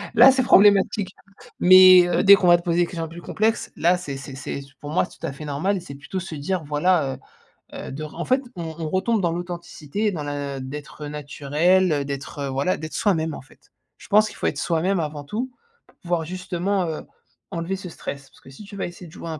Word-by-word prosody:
Là, 245 Hz, +4 st, +9 dB
c'est 260 Hz, 0 st, +1 dB
problématique. 200 Hz, -2 st, +4 dB, 0.4 s
Mais 185 Hz, 0 st, +8 dB
heu, 175 Hz, -, +1 dB
dès 200 Hz, +1 st, +9 dB
qu'on 185 Hz, -2 st, 0 dB
va 175 Hz, 0 st, +7 dB
te 170 Hz, -, -10 dB
poser 170 Hz, -1 st, 0 dB
des 175 Hz, -, +4 dB
questions 165 Hz, -1 st, -5 dB
plus 170 Hz, +2 st, -10 dB
complexes, 220 Hz, +5 st, -1 dB
là, 175 Hz, +2 st, +3 dB
c'est 140 Hz, -6 st, -6 dB
c'est 135 Hz, 0 st, -9 dB
c'est 140 Hz, 0 st, -5 dB
c'est 140 Hz, 0 st, -17 dB
pour 145 Hz, +1 st, -7 dB
moi, 175 Hz, -, +2 dB
c'est -, -, -17 dB
tout -, -, -5 dB
à -, -, -4 dB
fait 140 Hz, +3 st, -9 dB
normal 150 Hz, +8 st, -1 dB
et -, -, -4 dB
c'est 140 Hz, -5 st, -10 dB
plutôt 150 Hz, +7 st, -6 dB
se 180 Hz, -3 st, -7 dB
dire: 165 Hz, +4 st, -2 dB
«Voilà, 150 Hz, -2 st, +1 dB, 0.6 s
heu -, -, -7 dB
heu, -, -, -7 dB
de 140 Hz, +3 st, -6 dB
ren» 155 Hz, -, -9 dB
en 170 Hz, -, -2 dB
fait, 260 Hz, +1 st, +2 dB
on 175 Hz, -, -5 dB, 0.2 s
on 160 Hz, -2 st, -3 dB
retombe 200 Hz, +5 st, +1 dB
dans 170 Hz, -2 st, +1 dB
l'authenticité, 175 Hz, +2 st, -4 dB
dans 160 Hz, -6 st, -4 dB
la 145 Hz, -1 st, -4 dB
d'être 145 Hz, +3 st, -8 dB
naturel, 150 Hz, +5 st, +1 dB
heu, 145 Hz, -2 st, 0 dB
d'être, 140 Hz, +1 st, -5 dB
voilà, 135 Hz, +7 st, 0 dB
d'être 155 Hz, 0 st, -7 dB
soi-même, 165 Hz, -7 st, 0 dB
en -, -, -7 dB
fait. 135 Hz, -, -23 dB, 0.3 s
Je -, -, -15 dB
pense 215 Hz, +1 st, +4 dB
qu'il -, -, -10 dB
faut -, -, -1 dB
être -, -, -2 dB
soi-même 175 Hz, +3 st, 0 dB
avant 150 Hz, -2 st, -4 dB
tout, 230 Hz, -, -4 dB, 0.4 s
pour -, -, -26 dB
pouvoir 170 Hz, -2 st, -2 dB
justement, 185 Hz, +2 st, -2 dB
heu, 160 Hz, -, -4 dB, 0.5 s
enlever 170 Hz, +3 st, -3 dB
ce 190 Hz, -1 st, -8 dB
stress, 140 Hz, -4 st, -8 dB
parce -, -, -22 dB
que -, -, -15 dB
si 135 Hz, +10 st, -12 dB
tu 205 Hz, 0 st, -11 dB
vas -, -, -2 dB
essayer 175 Hz, 0 st, -11 dB
de -, -, -15 dB
jouer 165 Hz, -, -9 dB
un 160 Hz, -1 st, -5 dB
170 Hz, 240 wpm, -23 LUFS, 145-185 Hz, 0.6 s, Là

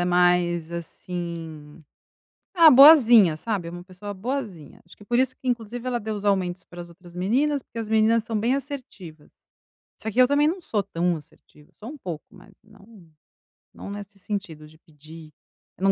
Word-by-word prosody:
é -, -, +1 dB
mais, 175 Hz, -2 st, +2 dB
assim, 165 Hz, -3 st, -7 dB, 0.7 s
ah, 335 Hz, -3 st, +8 dB
boazinha, 245 Hz, -, +7 dB
sabe, 195 Hz, -2 st, -3 dB
é -, -, -10 dB
uma 175 Hz, 0 st, -9 dB
pessoa 190 Hz, +3 st, -9 dB
boazinha. 205 Hz, -, -6 dB
Acho 175 Hz, -, -18 dB
que 205 Hz, -, -16 dB
por 240 Hz, +3 st, 0 dB
isso 260 Hz, 0 st, +1 dB
que 260 Hz, -, -9 dB
inclusive 240 Hz, 0 st, -3 dB
ela 245 Hz, -1 st, -1 dB
deu 215 Hz, 0 st, -4 dB
os 205 Hz, 0 st, -7 dB
aumentos 185 Hz, -3 st, 0 dB
para 175 Hz, 0 st, -10 dB
as 175 Hz, -, -11 dB
outras 175 Hz, 0 st, -17 dB
meninas, 260 Hz, +10 st, 0 dB
porque 230 Hz, -, -9 dB
as 225 Hz, -, -5 dB
meninas 220 Hz, +1 st, +2 dB
são 225 Hz, -2 st, -2 dB
bem 235 Hz, +5 st, +1 dB
assertivas. 235 Hz, -, -8 dB, 0.7 s
Só 220 Hz, -, -5 dB
que 240 Hz, -, -2 dB
eu 250 Hz, -, +6 dB
também 290 Hz, +2 st, +2 dB
não 360 Hz, +4 st, -2 dB
sou 210 Hz, -10 st, -2 dB
tão 175 Hz, 0 st, -1 dB
assertiva, 150 Hz, 0 st, -19 dB
sou 220 Hz, -, -10 dB
um 300 Hz, -, -9 dB
pouco, 175 Hz, -, -7 dB
mas 200 Hz, +1 st, -18 dB
não 205 Hz, -4 st, -19 dB, 0.6 s
não -, -, -9 dB
nesse 205 Hz, 0 st, -9 dB
sentido 180 Hz, -7 st, -6 dB
de 155 Hz, -, -20 dB
pedir, 155 Hz, 0 st, -15 dB, 0.5 s
eu -, -, -9 dB
não 195 Hz, -, +5 dB
200 Hz, 190 wpm, -24 LUFS, 175-235 Hz, 0.7 s, ah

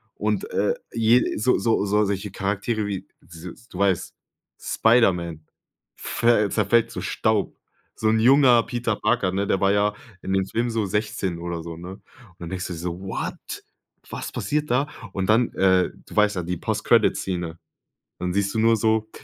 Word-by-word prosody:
Und, 430 Hz, -, -2 dB
äh, 470 Hz, +1 st, +1 dB, 0.2 s
je 115 Hz, +2 st, +3 dB
so 125 Hz, +4 st, +2 dB
so 115 Hz, -3 st, +1 dB
solche 100 Hz, 0 st, 0 dB
Charaktere 105 Hz, +3 st, -2 dB
wie, 100 Hz, -2 st, -5 dB
s 90 Hz, +7 st, -12 dB
du 90 Hz, -, -9 dB
weißt, 95 Hz, -3 st, +1 dB, 0.5 s
Spiderman 90 Hz, -9 st, +2 dB, 0.5 s
ver 115 Hz, -4 st, +1 dB
zerfällt 115 Hz, +3 st, +2 dB
zu -, -, -5 dB
Staub. 110 Hz, -2 st, 0 dB, 0.4 s
So 110 Hz, -, 0 dB
'n 110 Hz, 0 st, +3 dB
junger 125 Hz, -1 st, +6 dB
Peter 120 Hz, -3 st, -2 dB
Parker, 110 Hz, -4 st, +1 dB
ne? 100 Hz, +1 st, -1 dB
Der 95 Hz, -, 0 dB
war 100 Hz, 0 st, +4 dB
ja 105 Hz, 0 st, +2 dB, 0.3 s
in 95 Hz, -, -3 dB
dem 95 Hz, -1 st, +1 dB
Film 120 Hz, +4 st, -1 dB
so 110 Hz, -2 st, -1 dB
16 100 Hz, -3 st, -2 dB
oder 85 Hz, -1 st, -4 dB
so, 85 Hz, -1 st, -7 dB
ne? 90 Hz, +2 st, -8 dB
Und 95 Hz, -, -10 dB, 0.4 s
dann 85 Hz, -1 st, -7 dB
denkst 95 Hz, -1 st, -4 dB
du 90 Hz, -, -5 dB
so: 85 Hz, +1 st, -5 dB
„What? 95 Hz, -, -5 dB, 0.5 s
Was -, -, -6 dB
passiert 150 Hz, -2 st, -2 dB
da?“ 135 Hz, +4 st, +2 dB, 0.3 s
Und 95 Hz, -1 st, -2 dB
dann, 115 Hz, +2 st, +3 dB
äh, 95 Hz, -1 st, +3 dB, 0.2 s
du -, -, -12 dB
weißt 105 Hz, -1 st, +3 dB
ja, -, -, 0 dB
die 90 Hz, +1 st, -3 dB
Post -, -, -3 dB
Credit -, -, +4 dB
Szene. 85 Hz, -3 st, -4 dB, 0.6 s
Dann 90 Hz, 0 st, -2 dB
siehst 100 Hz, 0 st, 0 dB
du 110 Hz, -, +1 dB
nur 115 Hz, +1 st, +4 dB
so, 110 Hz, 0 st, +1 dB
100 Hz, 180 wpm, -24 LUFS, 90-115 Hz, 0.6 s, junger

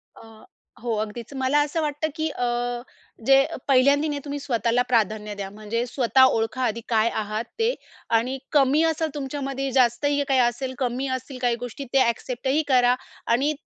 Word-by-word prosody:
अ, 225 Hz, -1 st, -15 dB, 0.4 s
हो 235 Hz, -2 st, -1 dB
अगदीच. 220 Hz, +4 st, -5 dB
मला 265 Hz, +2 st, +2 dB
असं 310 Hz, +2 st, -2 dB
वाटतं 300 Hz, +1 st, -1 dB
की 315 Hz, -1 st, -1 dB
अ, 245 Hz, -, -4 dB, 0.8 s
जे 270 Hz, +1 st, +7 dB
अ, -, -, -5 dB
पहिल्यांदी 280 Hz, +3 st, +4 dB
नाही 290 Hz, -1 st, -2 dB
तुम्ही 285 Hz, 0 st, -4 dB
स्वतःला 235 Hz, -2 st, +1 dB
प्राधान्य 215 Hz, -2 st, 0 dB
द्या 195 Hz, -1 st, -5 dB
म्हणजे 215 Hz, +3 st, -3 dB
स्वतः 260 Hz, +1 st, +3 dB
ओळखा 225 Hz, +3 st, -1 dB
आधी 230 Hz, -1 st, -1 dB
काय 225 Hz, 0 st, +3 dB
आहात 215 Hz, +2 st, -3 dB
ते 460 Hz, +2 st, +2 dB, 0.5 s
आणि 255 Hz, +3 st, -3 dB
कमी 290 Hz, +2 st, +4 dB
असेल 320 Hz, 0 st, 0 dB
तुमच्यामध्ये, 275 Hz, -1 st, -3 dB
जास्त 245 Hz, +1 st, +2 dB
ही 285 Hz, 0 st, +2 dB
काही 270 Hz, -1 st, +3 dB
असेल, 250 Hz, +2 st, 0 dB
कमी 255 Hz, +1 st, -1 dB
असतील 260 Hz, +1 st, -10 dB
काही 240 Hz, -1 st, +2 dB
गोष्टी 270 Hz, +4 st, -7 dB
ते 265 Hz, -3 st, +5 dB
एक्सेप्टही 265 Hz, +5 st, -1 dB
करा 250 Hz, -2 st, +4 dB, 0.4 s
आणि 285 Hz, +5 st, +1 dB
260 Hz, 170 wpm, -24 LUFS, 235-280 Hz, 0.8 s, जे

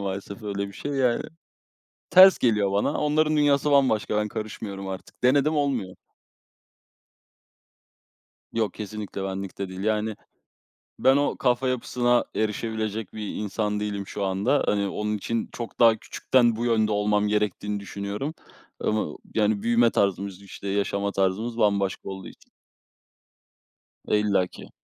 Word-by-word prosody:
maalesef 100 Hz, +2 st, -5 dB
öyle 100 Hz, -1 st, -3 dB
bir -, -, -11 dB
şey, 145 Hz, +8 st, -5 dB
yani, 125 Hz, -3 st, +1 dB, 0.9 s
ters 185 Hz, +2 st, +9 dB
geliyor 105 Hz, -5 st, +2 dB
bana, 100 Hz, +1 st, +1 dB
onların 155 Hz, +1 st, +2 dB
dünyası 145 Hz, 0 st, +3 dB
bambaşka, 130 Hz, -7 st, +3 dB
ben 105 Hz, 0 st, +1 dB
karışmıyorum 100 Hz, -2 st, -6 dB
artık, 95 Hz, +5 st, -8 dB
denedim 145 Hz, +4 st, +3 dB
olmuyor. 130 Hz, -11 st, -1 dB, 2.6 s
Yok, 110 Hz, -2 st, 0 dB
kesinlikle 105 Hz, -2 st, -6 dB
benlik 95 Hz, 0 st, -5 dB
de 100 Hz, -1 st, -3 dB
değil, 95 Hz, 0 st, -8 dB
yani, 110 Hz, 0 st, 0 dB, 0.8 s
ben 135 Hz, +1 st, +5 dB
o 145 Hz, 0 st, +1 dB
kafa 125 Hz, 0 st, +1 dB
yapısına 120 Hz, -1 st, +1 dB
erişebilecek 110 Hz, -1 st, -2 dB
bir 105 Hz, -2 st, -5 dB
insan 105 Hz, 0 st, -2 dB
değilim 100 Hz, -2 st, -3 dB
şu 100 Hz, -, -4 dB
anda. 95 Hz, +9 st, +1 dB
Hani, 100 Hz, -1 st, +1 dB
onun 105 Hz, +2 st, -2 dB
için, 115 Hz, +3 st, -2 dB
çok 120 Hz, -1 st, -7 dB
daha 115 Hz, -2 st, +7 dB
küçükten, 120 Hz, +1 st, +1 dB
bu 120 Hz, -, -2 dB
yönde 110 Hz, -2 st, +2 dB
olmam 105 Hz, 0 st, +1 dB
gerektiğini 105 Hz, 0 st, -1 dB
düşünüyorum, 100 Hz, +9 st, -5 dB, 0.5 s
ama, 110 Hz, 0 st, -1 dB, 0.2 s
yani, 105 Hz, -1 st, +2 dB
büyüme 120 Hz, 0 st, +4 dB
tarzımız 100 Hz, -1 st, -1 dB
işte, 100 Hz, 0 st, -8 dB
yaşama 100 Hz, 0 st, -1 dB
tarzımız 100 Hz, +5 st, -1 dB
bambaşka 100 Hz, -4 st, +1 dB
olduğu 95 Hz, -1 st, -7 dB
için. -, -, -17 dB, 1.6 s
E, -, -, +3 dB
illa 100 Hz, -3 st, +2 dB
ki. -, -, -13 dB
105 Hz, 135 wpm, -25 LUFS, 100-120 Hz, 2.6 s, ters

